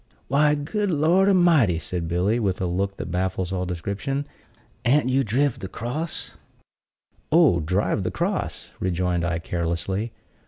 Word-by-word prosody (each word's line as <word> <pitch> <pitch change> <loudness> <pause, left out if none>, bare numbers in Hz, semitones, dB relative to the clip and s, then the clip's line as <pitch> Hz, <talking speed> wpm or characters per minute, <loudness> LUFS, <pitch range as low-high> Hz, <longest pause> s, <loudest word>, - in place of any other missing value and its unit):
"Why, 150 +3 +4
good 200 +8 -2
Lord 175 +5 +3
a'mighty!" 165 - +4
said 85 +1 -3
Billy, 90 +7 +1
with 95 -5 0
a 95 - -1
look 95 +3 -1
that - - -5
baffles 95 0 -1
all 90 -1 -2
description, 100 - -3 0.6
"an't 130 +1 +3
you 135 +1 +2
driv 130 +4 +1
the 95 - -5
cross?" 125 - -4 1.0
"Oh, 155 - +5
driv 95 +6 0
the 95 - -1
cross!" - - -3
rejoined 90 -1 0
I, 85 -1 0
carelessly. 85 +6 -2
100 Hz, 145 wpm, -24 LUFS, 90-145 Hz, 1.0 s, Oh